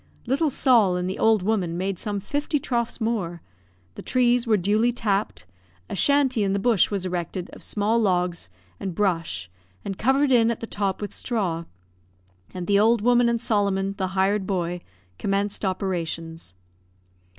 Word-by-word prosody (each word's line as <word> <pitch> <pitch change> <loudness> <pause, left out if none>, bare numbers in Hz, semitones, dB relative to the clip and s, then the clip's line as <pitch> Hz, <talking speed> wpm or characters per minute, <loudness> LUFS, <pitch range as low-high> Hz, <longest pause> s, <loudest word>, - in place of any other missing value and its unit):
Little 280 +6 +1
Sol. 235 -9 +3
and 180 0 -2
the 190 - -4
old 220 -4 +3
woman 185 -5 0
made 190 0 -2
some 205 -1 -2
fifty 290 +8 -1
troughs 240 -4 -2
more, 200 -7 -2 0.5
the - - -9
trees 245 -1 +2
were 215 -2 +4
duly 210 +6 +2
tapped, 210 - -1 0.5
a - - -2
shanty 275 0 +3
in 195 -1 0
the - - +1
bush 225 -2 +3
was 195 -3 -3
erected 180 0 -4
of - - -11
small 215 +3 +1
logs 180 - 0 0.3
and 185 -3 -4
brush 165 - -1 0.4
and 195 - -5
covered 270 +3 +2
in 230 -2 +5
at 235 - -2
the - - -5
top 200 -2 -2
with 205 - -5
straw; 180 -9 -2 0.9
and 180 -1 -5
the 200 +2 +3
old 225 0 +3
woman 245 0 +4
and 235 0 0
Solomon, 200 -4 0
the 190 - 0
hired 195 +1 +1
boy, 175 -2 -2 0.4
commenced 200 +1 -1
operations. 165 - -3
200 Hz, 160 wpm, -24 LUFS, 185-235 Hz, 0.9 s, in